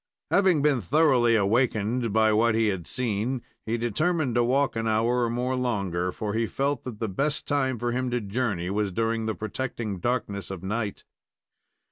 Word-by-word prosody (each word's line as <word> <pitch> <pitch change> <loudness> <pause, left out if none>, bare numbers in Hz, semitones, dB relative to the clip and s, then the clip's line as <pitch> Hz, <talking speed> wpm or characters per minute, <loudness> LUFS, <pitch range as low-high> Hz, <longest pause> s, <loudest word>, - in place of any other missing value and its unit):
Having 185 -7 +4
been 145 -5 +3
thoroughly 125 - +3
awakened 115 +2 +1
by 110 0 +3
what 110 +1 +3
he 110 -1 +3
had 95 -4 -3
seen, 120 +1 -1 0.2
he 115 +2 0
determined 140 - 0
to 120 0 +3
walk 135 +3 +1
an 115 0 -1
hour 115 +3 +2
or - - -1
more 125 +2 -1
longer, 100 -8 -1
for 105 +2 -4
he 115 +1 0
felt 140 0 -1
that 125 -4 -6
the 110 - -2
best 140 +10 -2
time 135 -3 +1
for 120 +2 -1
him 130 +1 -1
to 125 0 0
journey 100 -4 -2
was 105 -1 0
during 115 +2 -1
the 110 - -1
protecting 110 -2 -4
darkness 105 -4 -2
of 95 -2 -6
night. 105 +1 -3
115 Hz, 180 wpm, -26 LUFS, 105-125 Hz, 0.2 s, Having